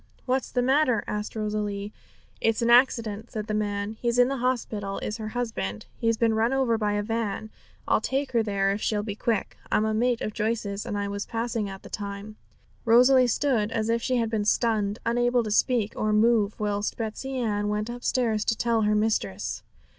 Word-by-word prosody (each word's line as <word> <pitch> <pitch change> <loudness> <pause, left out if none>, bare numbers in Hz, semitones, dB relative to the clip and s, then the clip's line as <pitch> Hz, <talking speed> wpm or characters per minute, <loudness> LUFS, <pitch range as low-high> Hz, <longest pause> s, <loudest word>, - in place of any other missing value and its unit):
'What's 260 +1 0
the 245 - +1
matter?' 260 -3 +3
asked 210 +1 -4
Rosalie. 210 -1 -3 0.5
'It's 225 +1 +1
an 235 - +3
accident,' 230 -3 +3
said 215 -1 -4
the 215 - -3
man. 205 0 -2
'He's 235 0 0
in 245 +1 +5
the 275 - -2
hospital, 225 -5 -2
is 210 - -4
her 220 -1 -5
husband; 215 - -3
he's 230 -1 +1
been 225 -1 +2
run 225 +3 +2
over 260 -4 +2
by 210 -2 0
a 205 0 0
van. 220 -1 -3 0.4
I'll - - +3
take 270 +1 -1
her 235 -2 +3
there 200 -2 +1
if 200 +2 -3
she'll 210 -1 0
be 205 -1 -4
quick; 220 -1 -1
I'm 215 - +3
a 220 - 0
mate 240 +2 +1
of 215 - -3
Joyce's, 215 -1 -2
and 205 -3 -2
I 205 0 -1
was 200 0 -4
passing 225 -2 -2
at 195 0 -9
the - - -11
time.' 205 +1 -6 0.5
Rosalie 250 +2 +6
stood 235 -4 +1
as 225 -1 -1
if 230 0 +1
she 255 +2 0
had 230 -2 0
been 215 -2 0
stunned, 215 -2 +1
unable 240 +1 +2
to 215 - -4
speak 220 -1 +2
or 215 - 0
move, 215 -1 +3
whilst 205 -1 -1
Betsey 245 +4 -4
Ann 205 -4 0
went 210 +1 -1
upstairs 240 -2 0
to 225 - +1
tell 235 -2 +1
her 210 0 +2
mistress. 210 - -1
220 Hz, 200 wpm, -26 LUFS, 210-240 Hz, 0.5 s, Rosalie